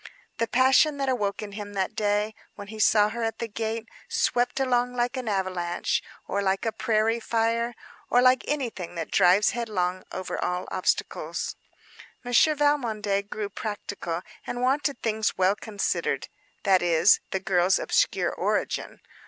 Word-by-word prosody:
The 230 Hz, -, +1 dB
passion 265 Hz, +5 st, +4 dB
that 275 Hz, -1 st, -1 dB
awoke 210 Hz, -4 st, -1 dB
in 205 Hz, -, -7 dB
him 205 Hz, 0 st, -7 dB
that 195 Hz, +2 st, -1 dB
day, 210 Hz, 0 st, 0 dB, 0.2 s
when 200 Hz, -1 st, -9 dB
he 220 Hz, 0 st, -8 dB
saw 210 Hz, 0 st, +5 dB
her 235 Hz, +2 st, -5 dB
at 225 Hz, -1 st, -1 dB
the 230 Hz, -, -3 dB
gate, 225 Hz, +1 st, -4 dB, 0.2 s
swept 270 Hz, -, +1 dB
along 250 Hz, -1 st, +1 dB
like 245 Hz, +1 st, 0 dB
an 255 Hz, -2 st, -4 dB
avalanche, 185 Hz, -3 st, -1 dB, 0.3 s
or 200 Hz, -, -1 dB
like 195 Hz, +2 st, 0 dB
a 225 Hz, -, +1 dB
prairie 220 Hz, +1 st, +1 dB
fire, 230 Hz, +1 st, 0 dB, 0.3 s
or 245 Hz, -, +4 dB
like 255 Hz, 0 st, +5 dB
anything 235 Hz, -, -3 dB
that 165 Hz, -2 st, -5 dB
drives 185 Hz, +4 st, +5 dB
headlong 185 Hz, -6 st, -2 dB
over 185 Hz, 0 st, -4 dB
all 180 Hz, 0 st, -2 dB
obstacles. 185 Hz, -, -1 dB, 0.7 s
Monsieur 250 Hz, +6 st, +4 dB
Valmondé 220 Hz, -9 st, 0 dB
grew 215 Hz, -2 st, -3 dB
practical 200 Hz, -4 st, -5 dB, 0.2 s
and 245 Hz, +1 st, -3 dB
wanted 275 Hz, +1 st, +1 dB
things 220 Hz, -1 st, 0 dB
well 190 Hz, +2 st, +3 dB
considered: 210 Hz, -2 st, -2 dB, 0.3 s
that 190 Hz, -3 st, +4 dB
is, 175 Hz, +3 st, +5 dB
the 190 Hz, -, -1 dB
girl's 185 Hz, 0 st, +2 dB
obscure -, -, +1 dB
origin. -, -, -2 dB
220 Hz, 155 wpm, -26 LUFS, 195-245 Hz, 0.7 s, saw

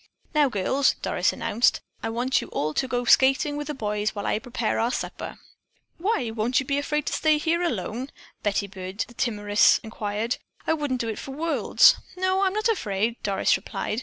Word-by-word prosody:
"Now, 295 Hz, -2 st, +4 dB
girls," 255 Hz, +6 st, +1 dB
Doris -, -, +1 dB
announced, 230 Hz, +4 st, +1 dB, 0.2 s
"I 225 Hz, -, -2 dB
want 245 Hz, +3 st, +1 dB
you -, -, -7 dB
all 155 Hz, +1 st, -2 dB
to 260 Hz, -, 0 dB
go 245 Hz, -1 st, -1 dB
skating 270 Hz, +4 st, +4 dB
with 295 Hz, 0 st, -4 dB
the 300 Hz, -, -4 dB
boys 210 Hz, -2 st, -2 dB
while 205 Hz, -, -4 dB
I -, -, +1 dB
prepare 235 Hz, -1 st, -2 dB
our 230 Hz, -, +2 dB
supper." -, -, -5 dB, 0.6 s
"Why, 335 Hz, -, 0 dB
won't 230 Hz, +3 st, +1 dB
you 275 Hz, -, -3 dB
be 280 Hz, +1 st, 0 dB
afraid 300 Hz, 0 st, -1 dB
to -, -, -2 dB
stay 310 Hz, -1 st, +3 dB
here 330 Hz, +3 st, 0 dB
alone?" 245 Hz, -, -2 dB, 0.3 s
Betty 200 Hz, -1 st, 0 dB
Byrd, 190 Hz, 0 st, -5 dB
the 240 Hz, -, -15 dB
timorous, 210 Hz, -4 st, +3 dB
inquired. 220 Hz, +1 st, -3 dB, 0.3 s
"I -, -, +2 dB
wouldn't 290 Hz, -5 st, -1 dB
do 230 Hz, -, -3 dB
it 220 Hz, -, -4 dB
for 270 Hz, -, -7 dB
worlds." 320 Hz, +3 st, +4 dB, 0.2 s
"No, 375 Hz, +1 st, +1 dB
I'm 380 Hz, -1 st, +2 dB
not 430 Hz, +2 st, +1 dB
afraid," 225 Hz, -, -1 dB
Doris 195 Hz, -1 st, +2 dB
replied. 215 Hz, -, -3 dB
245 Hz, 190 wpm, -25 LUFS, 210-295 Hz, 0.6 s, Now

